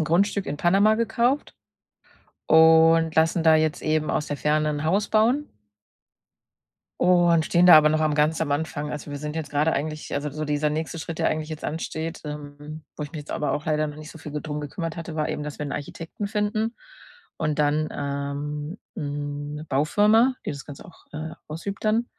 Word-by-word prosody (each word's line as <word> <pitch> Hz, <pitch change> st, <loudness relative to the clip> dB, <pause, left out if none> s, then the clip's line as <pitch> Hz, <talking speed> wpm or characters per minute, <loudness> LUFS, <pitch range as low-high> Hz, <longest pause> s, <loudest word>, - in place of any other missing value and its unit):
'n 155 Hz, -, +1 dB
Grundstück 195 Hz, +5 st, +1 dB
in 145 Hz, -, -3 dB
Panama 195 Hz, +6 st, +4 dB
gekauft 235 Hz, +5 st, 0 dB, 0.9 s
und 160 Hz, 0 st, +6 dB
lassen 160 Hz, +1 st, +3 dB
da 160 Hz, -1 st, +6 dB
jetzt 155 Hz, -1 st, +1 dB
eben 155 Hz, 0 st, 0 dB
aus 150 Hz, -, -1 dB
der 145 Hz, -, -3 dB
Ferne 150 Hz, 0 st, +1 dB
'n 145 Hz, 0 st, -3 dB
Haus 195 Hz, +6 st, +1 dB
bauen. 240 Hz, +7 st, +2 dB, 1.5 s
Und 175 Hz, -2 st, +4 dB
stehen 175 Hz, 0 st, +3 dB
da 175 Hz, -3 st, +10 dB
aber 150 Hz, -, +5 dB
noch 155 Hz, +1 st, +1 dB
am 155 Hz, -1 st, +1 dB
ganz 155 Hz, +2 st, +2 dB
am 145 Hz, -, -1 dB
Anfang. 150 Hz, 0 st, -2 dB
Also, 150 Hz, 0 st, -6 dB
wir 145 Hz, -, -4 dB
sind 150 Hz, +1 st, -5 dB
jetzt 160 Hz, -2 st, -4 dB
grade 150 Hz, +3 st, +2 dB
eigentlich 155 Hz, +1 st, -4 dB
also, 145 Hz, +1 st, -2 dB
so 155 Hz, +2 st, -4 dB
dieser 150 Hz, 0 st, 0 dB
nächste 160 Hz, +2 st, -3 dB
Schritt, 160 Hz, 0 st, -6 dB
der -, -, +2 dB
eigentlich 155 Hz, 0 st, -2 dB
jetzt 155 Hz, -1 st, -7 dB
ansteht, 160 Hz, +1 st, -4 dB
ähm, 150 Hz, +1 st, -8 dB
wo -, -, -6 dB
ich 145 Hz, -, -6 dB
mich 155 Hz, -, -6 dB
jetzt 145 Hz, -, -11 dB
aber 150 Hz, -, -1 dB
auch 150 Hz, -, -3 dB
leider 155 Hz, -1 st, +1 dB
noch 150 Hz, 0 st, -7 dB
nicht 155 Hz, +1 st, -10 dB
so 160 Hz, -, -12 dB
viel 150 Hz, -1 st, -9 dB
ge 150 Hz, -, -4 dB
drum 150 Hz, -1 st, -4 dB
gekümmert 165 Hz, +3 st, -5 dB
hatte, 165 Hz, -1 st, -6 dB
war 155 Hz, -1 st, -1 dB
eben, 150 Hz, -, -4 dB
dass 150 Hz, -1 st, -6 dB
wir 150 Hz, -, -3 dB
'n 145 Hz, -, -5 dB
Architekten 165 Hz, +7 st, -5 dB
finden 215 Hz, +2 st, -1 dB, 0.6 s
und 155 Hz, -1 st, -1 dB
dann, 150 Hz, +1 st, +2 dB
ähm, 145 Hz, +4 st, -4 dB, 0.2 s
'ne 145 Hz, -1 st, -5 dB
Baufirma, 210 Hz, -, +4 dB
die -, -, -2 dB
das 140 Hz, -2 st, -7 dB
Ganze 145 Hz, -2 st, -10 dB
auch, 170 Hz, -, -17 dB
äh, 155 Hz, +1 st, -5 dB, 0.2 s
ausübt 185 Hz, +6 st, -6 dB
dann. 225 Hz, +3 st, +2 dB
155 Hz, 205 wpm, -24 LUFS, 150-165 Hz, 1.5 s, da